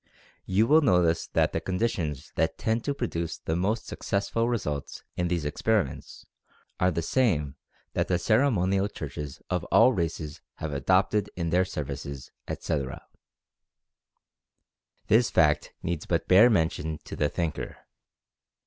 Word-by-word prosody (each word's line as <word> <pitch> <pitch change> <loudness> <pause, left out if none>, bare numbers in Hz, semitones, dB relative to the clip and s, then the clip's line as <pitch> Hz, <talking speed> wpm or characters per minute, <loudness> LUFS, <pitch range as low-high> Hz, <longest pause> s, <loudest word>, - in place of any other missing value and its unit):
You 100 +4 +3
will 155 +6 +5
notice 90 - +3
that - - +1
the - - -1
conditions 90 - -2
that 80 0 0
tend 115 +1 0
to 145 - 0
produce 85 - -3
the 80 - -3
most 100 +6 0
successful 115 +4 -1
results 75 -12 -3
in 90 - 0
these 85 -3 -1
experiments 95 +1 -1 0.5
are 90 - +4
the 85 -2 -2
same 80 - +1 0.4
that - - 0
the 90 - +2
cere 110 +10 +3
monial 95 -2 +1
churches 75 -2 -7
of 90 -2 0
all 130 - +5
races 80 -4 -3
have 80 -2 -5
adopted 95 +8 +2
in 85 -2 -2
their 90 +2 +3
services, 70 -4 -6 0.2
etc. 70 -5 -3 2.0
This 115 +3 +4
fact 75 -2 +3
needs 85 -2 -3
but 85 -2 0
bare 105 +6 +7
mention 80 -5 0
to - - -8
the 75 - +1
thinker. 85 -4 -3
90 Hz, 140 wpm, -27 LUFS, 75-105 Hz, 2.0 s, bare